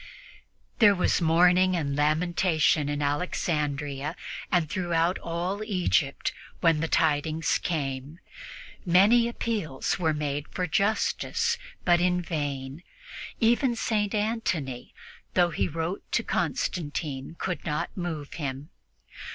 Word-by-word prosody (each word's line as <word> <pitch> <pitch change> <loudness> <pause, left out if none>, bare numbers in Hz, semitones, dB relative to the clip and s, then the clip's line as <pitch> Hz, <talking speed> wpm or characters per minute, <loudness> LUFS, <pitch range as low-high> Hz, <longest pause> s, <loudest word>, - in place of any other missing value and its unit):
There 205 -4 +7
was 180 - +1
mourning 180 +3 +4
and 140 -5 -1
lamentation 155 0 +2
in 145 0 -1
Alexandria 145 -1 -1 0.4
and 175 -3 +2
throughout 175 -1 0
all 175 +5 -3
Egypt 180 -8 0 0.3
when 165 -2 +3
the 165 - 0
tidings 155 0 +1
came. 140 -2 -3 0.7
Many 205 +7 +5
appeals 210 - -2
were 160 -3 +1
made 145 -1 -2
for 180 - -3
justice, 215 - 0 0.3
but 175 -1 +4
in 180 0 +2
vain. 145 -3 -4 0.6
Even 240 +2 +3
St. 215 -2 0
Antony, 205 - -2 0.4
though 175 -1 +4
he - - 0
wrote 165 +3 -3
to - - +2
Constantine, 145 -3 -2
could 180 -2 -3
not 150 -2 -3
move 165 -6 -4
him. 140 0 -5
165 Hz, 110 wpm, -27 LUFS, 145-185 Hz, 0.7 s, There